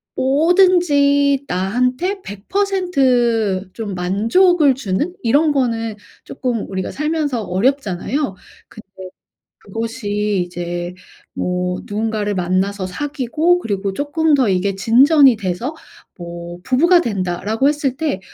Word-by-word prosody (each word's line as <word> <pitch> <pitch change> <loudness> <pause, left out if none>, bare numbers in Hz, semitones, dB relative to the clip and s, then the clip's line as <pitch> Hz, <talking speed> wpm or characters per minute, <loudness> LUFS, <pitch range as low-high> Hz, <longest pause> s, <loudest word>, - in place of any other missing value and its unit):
뭐든지 285 -2 +3
나한테 250 - -1
100% 240 - 0
좀 210 -4 -5
만족을 265 - +3
주는 265 - -2
이런 290 +7 +3
거는 230 -5 -1 0.3
쪼끔 245 -5 -3
우리가 190 -1 -4
살면서 300 -6 -2
어렵잖아요. 210 +3 -1 0.3
근데 220 -3 -14 0.7
그것이 210 -3 -2
이제 175 0 -5 0.4
뭐 180 0 -2
누군가를 210 0 -2
만나서 185 +2 -1
사귀고 295 - 0
그리고 200 - -3
쪼끔 295 +7 0
더 260 -5 +3
이게 190 +1 0
진전이 260 +5 +5
돼서 215 - -3 0.4
뭐 170 0 -8
"부부가 340 - +4
된다."라고 205 - -1
했을 290 -3 -1
때 295 -11 -1
230 Hz, 230 characters per minute, -18 LUFS, 195-290 Hz, 0.7 s, 진전이